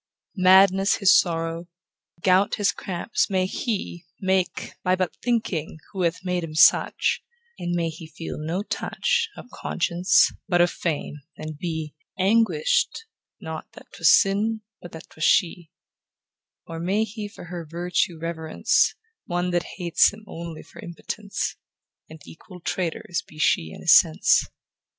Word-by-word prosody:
Madness 190 Hz, +1 st, +5 dB
his 200 Hz, -1 st, +5 dB
sorrow, 165 Hz, 0 st, 0 dB, 0.6 s
gout 190 Hz, +1 st, +3 dB
his 200 Hz, -1 st, +2 dB
cramps, 185 Hz, +3 st, -2 dB
may 185 Hz, -2 st, +1 dB
he 190 Hz, -3 st, -4 dB
Make, 190 Hz, -1 st, -1 dB
by 185 Hz, 0 st, +3 dB
but 185 Hz, -2 st, -2 dB
thinking 200 Hz, -11 st, -2 dB, 0.2 s
who 190 Hz, -, -3 dB
hath 170 Hz, +1 st, -1 dB
made 180 Hz, -1 st, -1 dB
him 155 Hz, -2 st, -7 dB
such; -, -, +4 dB, 0.4 s
And 175 Hz, 0 st, -2 dB
may 170 Hz, -1 st, 0 dB
he 160 Hz, 0 st, -9 dB
feel 165 Hz, 0 st, -7 dB
no 165 Hz, +6 st, -2 dB
touch 455 Hz, -, -1 dB
Of 250 Hz, -, -11 dB
conscience, 180 Hz, +1 st, +2 dB, 0.2 s
but 175 Hz, -2 st, +2 dB
of 175 Hz, 0 st, +4 dB
fame, 150 Hz, -3 st, -3 dB, 0.2 s
and 155 Hz, 0 st, -6 dB
be 160 Hz, -1 st, -4 dB, 0.2 s
Anguish'd, 230 Hz, -, +2 dB, 0.4 s
not -, -, -7 dB
that -, -, -15 dB
'twas -, -, +4 dB
sin, 215 Hz, +3 st, 0 dB, 0.2 s
but 175 Hz, -, -10 dB
that 160 Hz, -, -10 dB
'twas 155 Hz, -, -7 dB
she; 170 Hz, -2 st, +2 dB, 1.0 s
Or 165 Hz, 0 st, -7 dB
may 195 Hz, +6 st, +1 dB
he 215 Hz, -1 st, -6 dB
for 205 Hz, -, -12 dB
her 175 Hz, 0 st, -6 dB
virtue 170 Hz, +1 st, -1 dB
reverence 160 Hz, -1 st, 0 dB, 0.3 s
One 175 Hz, +1 st, -1 dB
that 175 Hz, -1 st, -2 dB
hates 175 Hz, -3 st, +3 dB
him 215 Hz, +1 st, -13 dB
only 165 Hz, -4 st, -8 dB
for -, -, -16 dB
impotence, 200 Hz, +4 st, -5 dB, 0.5 s
And 160 Hz, 0 st, -11 dB
equal 180 Hz, +3 st, -13 dB
traitors 170 Hz, 0 st, -3 dB
be 155 Hz, -, -16 dB
she 80 Hz, -, +2 dB
and -, -, -11 dB
his -, -, +7 dB
sense. 80 Hz, -, +2 dB
175 Hz, 145 wpm, -24 LUFS, 165-195 Hz, 1.0 s, his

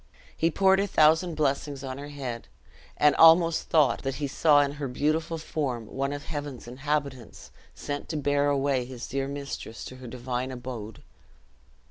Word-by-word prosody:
He 165 Hz, -, +2 dB
poured 190 Hz, +3 st, +3 dB
a 200 Hz, -, +1 dB
thousand 160 Hz, 0 st, +3 dB
blessings 140 Hz, -1 st, -1 dB
on 130 Hz, 0 st, -5 dB
her 145 Hz, -, -7 dB
head, 130 Hz, -5 st, -6 dB, 0.5 s
and 150 Hz, 0 st, +4 dB
almost 165 Hz, 0 st, +6 dB
thought 145 Hz, -7 st, +3 dB
that 135 Hz, -1 st, -3 dB
he 150 Hz, -, -3 dB
saw 145 Hz, +1 st, +4 dB
in 140 Hz, -1 st, 0 dB
her 140 Hz, -, -1 dB
beautiful 155 Hz, +5 st, -1 dB
form 135 Hz, -7 st, -3 dB
one 135 Hz, +5 st, -3 dB
of 145 Hz, 0 st, -5 dB
heaven's 145 Hz, -6 st, -6 dB
inhabitants 135 Hz, -1 st, -4 dB, 0.2 s
sent 145 Hz, 0 st, -5 dB
to 155 Hz, -, -2 dB
bear 145 Hz, 0 st, +1 dB
away 140 Hz, -2 st, +1 dB
his 125 Hz, -1 st, -8 dB
dear 135 Hz, 0 st, -2 dB
mistress 140 Hz, -5 st, -6 dB
to 130 Hz, -, -9 dB
her 130 Hz, -1 st, -10 dB
divine 125 Hz, +1 st, -4 dB
abode. 120 Hz, -4 st, -7 dB
140 Hz, 165 wpm, -27 LUFS, 130-150 Hz, 0.5 s, almost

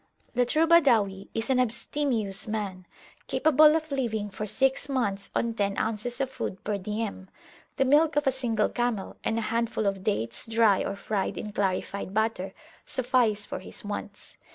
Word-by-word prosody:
The 245 Hz, 0 st, +2 dB
true 315 Hz, +5 st, +3 dB
Badawi 230 Hz, -, +4 dB
is 225 Hz, +4 st, -1 dB
an 255 Hz, -, +3 dB
abstemious 235 Hz, -4 st, 0 dB
man, 200 Hz, -4 st, -4 dB, 0.4 s
capable 305 Hz, 0 st, +5 dB
of 315 Hz, -1 st, -2 dB
living 220 Hz, -6 st, -1 dB
for 210 Hz, +2 st, -5 dB
six 270 Hz, +5 st, +1 dB
months 205 Hz, -7 st, -1 dB
on 235 Hz, -1 st, 0 dB
ten 200 Hz, -3 st, -1 dB
ounces 225 Hz, +3 st, -2 dB
of 270 Hz, -1 st, -1 dB
food 190 Hz, -7 st, -5 dB
per 205 Hz, -1 st, -2 dB
diem; 210 Hz, -1 st, -4 dB, 0.5 s
the 270 Hz, -, +2 dB
milk 295 Hz, +3 st, +4 dB
of 295 Hz, -, +2 dB
a 270 Hz, -, +4 dB
single 235 Hz, -5 st, 0 dB
camel, 240 Hz, -5 st, -2 dB
and 225 Hz, -, 0 dB
a -, -, 0 dB
handful 225 Hz, 0 st, -1 dB
of 195 Hz, -1 st, -1 dB
dates, 115 Hz, -, -2 dB
dry 225 Hz, -3 st, +3 dB
or 195 Hz, -, -3 dB
fried 200 Hz, 0 st, -2 dB
in 210 Hz, -, -5 dB
clarified 200 Hz, 0 st, -2 dB
butter, 220 Hz, -3 st, 0 dB, 0.3 s
suffice 240 Hz, -5 st, +1 dB
for -, -, -5 dB
his 185 Hz, -, -6 dB
wants. 205 Hz, 0 st, -7 dB
225 Hz, 170 wpm, -27 LUFS, 200-255 Hz, 0.5 s, capable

